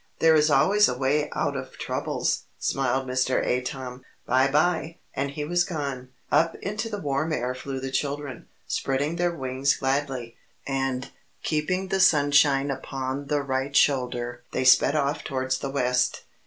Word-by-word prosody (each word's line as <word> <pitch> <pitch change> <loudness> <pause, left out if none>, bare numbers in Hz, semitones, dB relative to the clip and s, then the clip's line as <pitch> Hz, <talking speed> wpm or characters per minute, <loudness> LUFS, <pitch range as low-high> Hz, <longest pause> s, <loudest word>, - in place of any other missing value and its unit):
"There 160 0 +5
is 155 0 +4
always 195 +9 +5
a 125 - -2
way 145 +3 +1
out - - 0
of - - -6
troubles," - - -2
smiled 135 0 0
Mr. 130 0 +1
Atom. 125 0 -3 0.2
"By 130 +2 +3
by!" 160 +3 +1 0.2
And 140 +1 -1
he 145 +1 -4
was 175 +3 +2
gone. 140 -7 -4 0.2
Up 165 +1 +3
into 215 +3 -4
the 210 - -4
warm 150 -2 -1
air 125 -4 -1
flew 135 +1 -5
the 135 0 -5
children, 140 -1 -3 0.2
spreading 145 +5 -1
their 175 0 +2
wings 135 -1 0
gladly. 135 -3 -2 0.3
And 135 -1 -2 0.3
Keeping 185 +5 -1
the 190 - 0
Sunshine 145 -4 +4
Upon 135 +1 -4
the 145 0 0
right 135 +1 -2
shoulder 120 -3 +1
they - - 0
sped 130 +3 +5
off 145 0 0
towards 130 -2 -2
the 140 - -4
West. 125 -2 0
140 Hz, 155 wpm, -25 LUFS, 130-150 Hz, 0.3 s, There